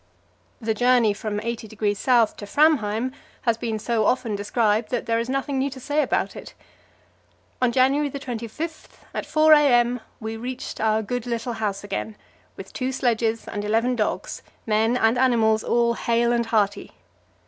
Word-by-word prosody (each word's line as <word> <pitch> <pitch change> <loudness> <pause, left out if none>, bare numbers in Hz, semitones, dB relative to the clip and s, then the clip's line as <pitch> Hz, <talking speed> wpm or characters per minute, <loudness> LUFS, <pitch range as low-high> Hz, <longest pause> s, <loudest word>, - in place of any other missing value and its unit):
The 225 -2 -1
journey 245 -1 +3
from 205 0 -4
80° 220 -2 -3
S. 240 -4 +4
to 205 - -9
Framheim 255 -4 +2 0.3
has 230 -3 +2
been 225 -1 -3
so 220 +1 0
often 235 -3 +1
described 210 +1 0
that 245 - -2
there 230 0 +1
is 235 +2 -3
nothing 275 0 -1
new 275 +1 0
to 260 -1 -9
say 290 +4 0
about - - -1
it. - - -10 1.1
On 250 -1 +3
January 270 +4 +2
25, 270 +4 -7
at - - -4
4 310 0 +5
a.m., 245 -5 +4 0.2
we 220 0 -5
reached 250 +2 -6
our 220 0 +2
good 245 +3 -4
little 235 0 -2
house 205 -3 -3
again, 205 +2 -4 0.4
with - - -10
two 255 0 -2
sledges 230 -3 0
and 205 - -4
eleven 225 +4 +1
dogs; 215 -3 -2 0.2
men 225 +2 +2
and 225 +1 +2
animals 225 -4 +3
all 235 0 +2
hale 235 0 +1
and 235 -1 0
hearty. 205 -2 0
235 Hz, 160 wpm, -23 LUFS, 220-255 Hz, 1.1 s, 4